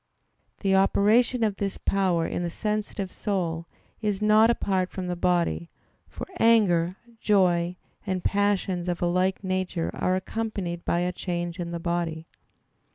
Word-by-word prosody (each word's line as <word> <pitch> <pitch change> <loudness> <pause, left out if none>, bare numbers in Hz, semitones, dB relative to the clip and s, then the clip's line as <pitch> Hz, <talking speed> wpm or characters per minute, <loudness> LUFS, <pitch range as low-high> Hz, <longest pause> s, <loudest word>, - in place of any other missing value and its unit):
The 195 -1 +2
operation 220 +5 +3
of 210 -3 0
this 200 -1 -2
power 185 -4 +1
in - - -2
the 175 - -1
sensitive 210 0 -3
soul 170 -5 -2 0.3
is 210 -3 0
not 215 +1 +5
apart 190 -5 0
from 185 - -5
the 180 0 -2
body; 175 -1 0 0.4
for - - -7
anger, 185 -7 +4 0.2
joy, 180 -5 +2 0.3
and 185 -2 -1
passions 195 -3 0
of 175 0 -2
a - - +3
like 185 +3 +1
nature 185 -2 -1
are 185 - 0
accompanied 185 -3 -3
by 170 - +1
a 180 0 0
change 175 0 -4
in 170 -1 -3
the 170 0 -4
body. 165 -1 -2
185 Hz, 150 wpm, -26 LUFS, 175-200 Hz, 0.4 s, not